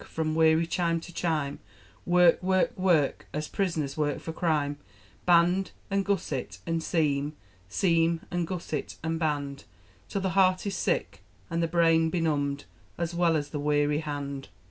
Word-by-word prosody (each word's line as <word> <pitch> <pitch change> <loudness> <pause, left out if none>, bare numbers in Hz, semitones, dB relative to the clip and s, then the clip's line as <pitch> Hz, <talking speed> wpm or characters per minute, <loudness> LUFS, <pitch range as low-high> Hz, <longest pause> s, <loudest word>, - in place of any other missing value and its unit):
From 155 -1 -2
weary 160 +1 +4
chime 170 0 0
to 175 - -11
chime, 155 -5 -1 0.5
Work 175 -1 +5
work 185 0 +1
work 175 -7 +1
As 150 0 -2
prisoners 165 -8 -1
work 145 -2 0
for 160 - -6
crime! 150 -4 0 0.5
Band, 175 +2 +4 0.2
and 195 0 +2
gusset, 180 -9 -2
and 165 -1 -1
seam, 150 -3 0 0.4
Seam, 165 - +2
and 175 -2 -1
gusset, 165 -5 -4
and 160 0 -1
band, 145 -3 -2 0.4
Till 195 - -2
the 190 - 0
heart 185 0 +3
is 200 -1 -2
sick, 90 - -1 0.3
and 165 0 0
the 165 - +1
brain 165 -1 +3
benumbed, 145 -4 -1 0.3
As 170 0 -2
well 170 -1 +3
as 145 -2 -1
the 145 - -4
weary 145 0 +2
hand. 145 -3 -5
165 Hz, 155 wpm, -28 LUFS, 145-175 Hz, 0.5 s, Work